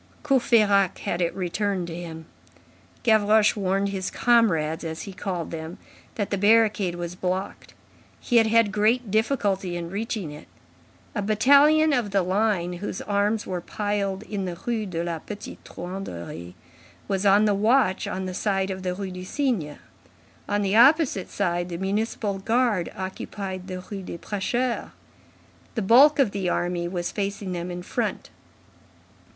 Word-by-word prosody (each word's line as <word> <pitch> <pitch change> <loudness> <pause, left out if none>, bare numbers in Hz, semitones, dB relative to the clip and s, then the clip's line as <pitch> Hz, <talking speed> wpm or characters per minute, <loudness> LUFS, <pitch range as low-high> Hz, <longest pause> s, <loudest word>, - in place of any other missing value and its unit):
Courfeyrac 215 - +3
had 175 - -2
it 170 - +1
returned 190 0 -1
to 165 -1 -7
him. 165 -2 -7 0.8
Gavroche 215 -1 +4
warned 195 0 0
"his 190 -2 -3
comrades" 180 -10 +2
as 160 -1 -5
he 200 - -8
called 180 -3 -4
them, 160 +1 -6 0.4
that 205 -3 -3
the 200 - 0
barricade 210 -3 +3
was 175 0 -5
blocked. 185 +2 -4 0.4
He 240 - +1
had 225 -1 +5
had 225 -2 +3
great 215 +2 +1
difficulty 200 -6 0
in 170 0 -6
reaching 205 -5 -3
it. 150 - -11 0.7
A 205 - -2
battalion 285 +9 +5
of 240 -6 0
the 195 -1 +1
line 185 -2 0
whose 205 - -4
arms 205 +1 0
were 180 -2 -3
piled 205 0 -2
in 205 -3 -4
the 175 -2 -5
Rue 225 -3 -1
de 170 -2 -3
la 170 -2 -3
Petite 205 +5 -9
Truanderie 90 - -7 0.5
was 195 -1 -1
on 200 +1 +5
the 210 - +3
watch 215 -1 +2
on 185 0 -3
the 185 - -4
side 195 0 0
of 190 0 -5
the 180 -1 -2
Rue 195 -1 -5
du 180 0 -7
Cygne; 190 - -1 0.7
on 205 0 +1
the 195 +1 +1
opposite 255 - +4
side, 175 -2 -1
the 170 - -4
municipal 200 +1 -2
guard 225 -3 +1
occupied 190 0 -5
the 185 -1 -5
Rue 195 +1 -7
des 180 - -7
Prêcheurs. 235 +7 -2 0.9
The 225 - -1
bulk 270 +9 +7
of 265 -8 +3
the 195 -3 -2
army 175 0 -1
was 175 -1 -3
facing 200 -1 -3
them 175 0 -4
in 175 0 -6
front. - - -3
195 Hz, 155 wpm, -25 LUFS, 180-215 Hz, 0.9 s, bulk